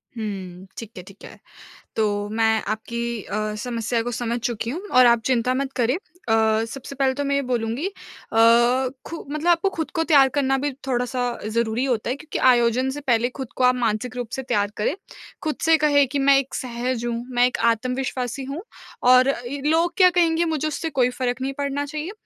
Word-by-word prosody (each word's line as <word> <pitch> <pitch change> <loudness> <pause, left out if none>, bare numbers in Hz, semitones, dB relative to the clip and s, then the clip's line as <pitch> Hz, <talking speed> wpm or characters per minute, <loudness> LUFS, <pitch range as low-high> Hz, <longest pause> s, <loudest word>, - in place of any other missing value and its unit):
हुँ, 190 -4 -6
ठीक 230 -1 -7
है, 180 - -7
ठीक 195 +2 -16
है। - - -13 0.6
तो 220 - +2 0.2
मैं 220 -1 +2
आपकी 235 +1 -4
अ, 215 0 -3
समस्या 230 +1 -2
को 245 - -3
समझ 235 0 -2
चुकी 235 -1 -3
हूँ 330 +9 -4
और 255 0 +6
आप 235 -1 +5
चिंता 250 -1 +1
मत 270 +1 -2
करें। 250 +1 +1 0.3
अ, 220 0 +3
सबसे 270 +4 -8
पहले 265 -1 +1
तो 285 - -3
मैं 280 - +1
ये 280 - +2
बोलूँगी 245 +4 -2
अ, 400 - -6 1.1
खु 330 - -7
मतलब 305 +3 -3
आपको 340 +3 +2
खुद 320 - -3
को 325 - +2
तैयार 280 -5 +5
करना 270 -2 +1
भी 285 +2 -1 0.2
थोड़ा-सा 250 0 -1 0.2
ज़रूरी 230 +2 0
होता 240 -4 -1
है 255 - 0
क्योंकि 310 +2 -6
आयोजन 245 +1 +3
से 290 +2 -5
पहले 245 -3 +1
खुद 260 - -5
को 255 - -1
आप 250 0 +5
मानसिक 235 +1 -1
रूप 245 -2 -4
से 265 - -4
तैयार 205 -5 0
करें। 210 - 0 0.5
खुद 310 -1 -1
से 325 0 +5
कहें 290 -2 +3
कि, 280 +2 -2
"मैं 275 0 +5
एक 270 - -6
सहज 240 -1 -3
हूँ। 235 0 -2
मैं 245 0 +5
एक 250 - -3
आत्मविश्वासी 255 +2 -3
हूँ 275 +5 -5 0.5
और 255 +1 +6 0.2
ई 280 +3 -5
लोग 330 +3 +2
क्या 370 -2 +7
कहेंगे 340 -1 +2
मुझे 310 -2 -1
उससे 320 +2 -3
कोई 255 -4 +2
फ़र्क 250 0 -3
नहीं 270 +1 -2
पड़ना 285 0 -2
चाहिए।" 305 +5 -5
250 Hz, 200 wpm, -23 LUFS, 230-280 Hz, 1.1 s, क्या